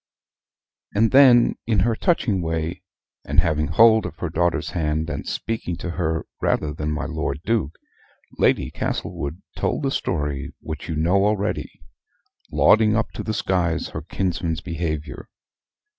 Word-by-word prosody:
And 110 +2 +3
then 130 -3 +6
in 110 -5 +2
her 115 +3 +2
touching 115 - +1
way, 80 0 -2 0.4
and - - +2
having 80 -1 +1
hold 110 -1 +5
of - - -10
her 90 - -4
daughter's 85 +1 0
hand, 80 0 -1
and - - -5
speaking 110 -6 -3
to 90 - -4
her 80 -2 -1 0.2
rather 75 -1 0
than 75 0 -3
my 75 - -2
Lord 80 -4 -3
Duke, 105 -9 0 0.6
Lady - - +2
Castlewood 75 +6 -4
told - - -1
the 135 - 0
story 75 - -2
which 80 +1 -7
you 80 - -2
know 90 +6 +2
already 105 -1 -1 0.8
lauding 110 0 +4
up 115 0 0
to - - -6
the 110 - -3
skies 90 -7 0
her - - -6
kinsman's 85 -4 -2
behavior. 80 -2 -4
85 Hz, 145 wpm, -23 LUFS, 80-110 Hz, 0.8 s, then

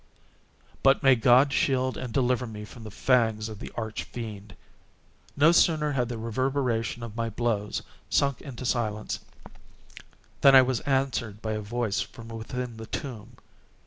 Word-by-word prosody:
But 135 0 +4
may 135 -1 +7
God 130 +3 +5
shield 130 -3 +1
and 125 - -5
deliver 125 0 +1
me 105 -1 -7
from 115 +2 -12
the 110 - -7
fangs 110 -1 +1
of 105 -2 -8
the - - -8
Arch 110 -2 -3
Fiend! 105 -4 -8 0.8
No 150 +4 +6
sooner 155 -3 +3
had 125 -4 0
the 120 - -4
reverberation 120 0 -1
of 115 -2 -7
my 115 -1 -1
blows 105 -2 -2 0.3
sunk 140 -2 +1
into 130 -3 -8
silence, 110 -4 -1 1.2
than 135 -1 +8
I 130 - +9
was 130 -2 0
answered 130 -6 0
by 110 0 -4
a 105 0 -2
voice 110 -1 -2
from 115 +3 -9
within 115 +1 -5
the 110 0 -8
tomb! 120 -3 -6
120 Hz, 155 wpm, -27 LUFS, 110-130 Hz, 1.2 s, I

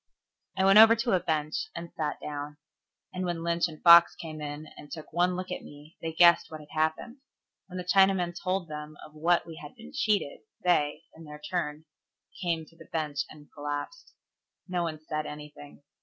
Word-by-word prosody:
I 190 - +3
went 195 +2 +8
over 225 +1 +9
to 230 +1 -1
a 185 - +4
bench, 155 -2 -2
and 170 0 -7
sat 155 -2 -2
down; 145 0 -6 0.6
and 185 0 -3
when 175 -2 -2
Lynch 170 +1 +1
and 155 -2 -12
Fox 170 0 +9
came 155 -2 -8
in 145 +1 -6
and 145 - -13
took 155 -2 -9
one 180 +2 +2
look 185 +1 -5
at - - -4
me, 145 +2 -14
they 165 - -3
guessed 170 +1 +5
what 155 - -8
had 150 -1 -15
happened. 160 - -1 0.5
When 185 -1 -8
the 180 - -3
Chinaman 190 -1 +3
told 185 -1 -2
them 150 0 -8
of 155 - -15
what 170 +3 +2
we 165 -2 -10
had 150 - -11
been 235 +3 -12
cheated, 210 - 0 0.2
they, 155 -3 +2
in 165 0 -12
their 150 0 -9
turn, 150 -1 -4 0.6
came 165 -3 -1
to 165 - -22
the - - -16
bench, 150 -3 -2
and 150 -1 -15
collapsed. 145 - -6 0.5
No 180 -1 -1
one 160 -2 -3
said 155 0 -4
anything. 150 -1 -10
165 Hz, 195 wpm, -28 LUFS, 150-180 Hz, 0.6 s, over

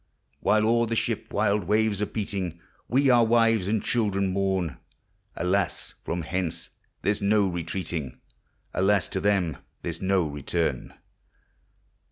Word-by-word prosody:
While 110 0 +3
o'er 115 0 +3
the 115 - -1
ship - - -2
wild 100 -2 +1
waves 105 +1 +2
are 105 - +1
beating, 95 -5 -3 0.3
We 135 +2 +4
our 120 -1 +6
wives 115 -3 +3
and 105 0 0
children 100 -5 0
mourn; 95 -6 0 0.6
Alas! 90 +1 -1
from 85 0 -3
hence 85 0 -3 0.3
there 100 - +3
's 105 - -7
no 100 0 +3
retreating, 85 -5 -4 0.5
Alas! 100 +1 +2
to 95 - -1
them 95 -7 +1 0.3
there 85 - -2
's 85 - -11
no 95 -1 +2
return 75 -2 -2
100 Hz, 140 wpm, -26 LUFS, 90-110 Hz, 0.6 s, our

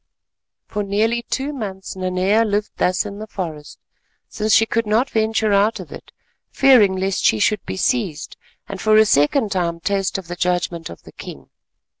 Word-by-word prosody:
For 210 - -4
nearly 215 +4 0
two 280 +3 -2
months 195 -8 -6
Nanea 185 +4 +1
lived 210 -1 -1
thus 180 +3 +1
in 205 0 -7
the 215 - -7
forest, 160 -8 -7 0.5
since 215 0 -2
she 225 +2 +5
could 230 0 -1
not 225 +5 +1
venture 220 -1 +1
out 205 +3 +2
of - - -10
it—fearing 240 -8 +1
lest 190 0 -1
she 110 - +4
should 210 - +1
be - - -4
seized, 190 - -1 0.3
and 195 -1 -7
for 215 0 +4
a 220 - +6
second 205 - +2
time 170 -3 -1
taste 195 +2 -1
of 190 -3 -8
the 175 - -5
judgment 175 -2 -2
of 85 - -12
the - - -14
king. 70 -1 -11
200 Hz, 175 wpm, -20 LUFS, 180-220 Hz, 0.5 s, a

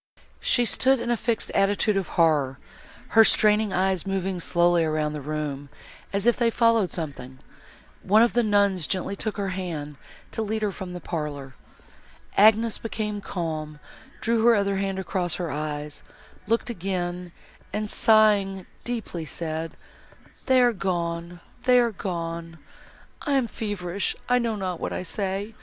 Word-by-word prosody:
She 245 - +2
stood 260 +3 +3
in 235 0 -2
a - - +3
fixed 230 0 -2
attitude 205 +1 +2
of 195 -4 -1
horror, 150 -6 +3 0.5
her 225 - +7
straining 210 -1 +4
eyes 185 -1 +1
moving 190 -1 -1
slowly 175 0 +3
round 155 -1 0
the 150 - -5
room, 145 -1 -4 0.4
as 200 +1 -1
if 240 - +4
they 235 -2 +3
followed 230 -4 +3
something. 135 -6 -5 0.6
One 215 +4 +5
of 235 - +2
the 240 - +3
nuns 200 -6 +2
gently 190 +1 -2
took 215 +2 -4
her 200 -1 -1
hand, 165 -6 -5 0.3
to - - -3
lead 220 0 -2
her 205 - +1
from 185 -2 -7
the 180 - -7
parlour. 145 -5 -5 0.8
Agnes 220 +2 +5
became 210 -2 -3
calm, 155 -5 -4 0.4
drew 230 0 +1
her 235 0 +6
other 200 -1 +1
hand 195 0 -2
across 180 -2 -1
her 175 -3 -3
eyes, 150 0 -4 0.5
looked 230 +2 0
again, 180 -3 -3 0.4
and, 210 0 -2
sighing 205 -4 +3 0.2
deeply, 225 -8 -4
said, 160 +1 -5 0.7
"They 260 -1 +5
are 245 -1 +4
gone—they 175 +5 -1
are 235 -1 +2
gone! 170 -4 -5 0.6
I 290 - -1
am 265 -3 +3
feverish, 200 -4 -3
I 250 0 +3
know 230 -2 -1
not 185 -4 -3
what - - -3
I - - -3
say. 195 +3 -3
190 Hz, 150 wpm, -25 LUFS, 170-220 Hz, 0.8 s, her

